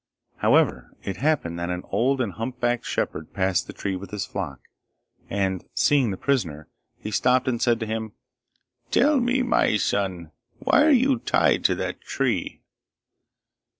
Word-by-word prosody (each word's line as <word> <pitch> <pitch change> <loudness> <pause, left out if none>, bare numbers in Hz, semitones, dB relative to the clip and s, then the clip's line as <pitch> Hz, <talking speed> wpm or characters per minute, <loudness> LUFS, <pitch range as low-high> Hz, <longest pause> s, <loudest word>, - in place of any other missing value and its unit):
However, - - +2
it 95 -1 -4
happened 130 - 0
that 85 0 -3
an 90 0 -3
old 130 +3 +2
and 105 -7 -2
humpbacked 120 +1 -2
shepherd 80 - -3
passed 95 -2 0
the - - -6
tree 95 -1 -3
with 95 0 -7
his 105 0 -3
flock, 80 -9 -5 0.7
and 95 -2 -1
seeing 140 -5 +3
the 95 - -3
prisoner, 80 - -1 0.3
he 105 - -7
stopped 125 +4 +2
and 120 -3 0
said 120 -2 +2
to - - -1
him, 110 -1 -4 0.8
'Tell 285 +3 +4
me, 255 +2 +1
my 245 - +2
son 95 -6 -1 0.3
why - - +3
are - - +5
you 265 -2 +4
tied - - +2
to - - +4
that - - -4
tree? - - -2
110 Hz, 155 wpm, -24 LUFS, 95-135 Hz, 0.8 s, are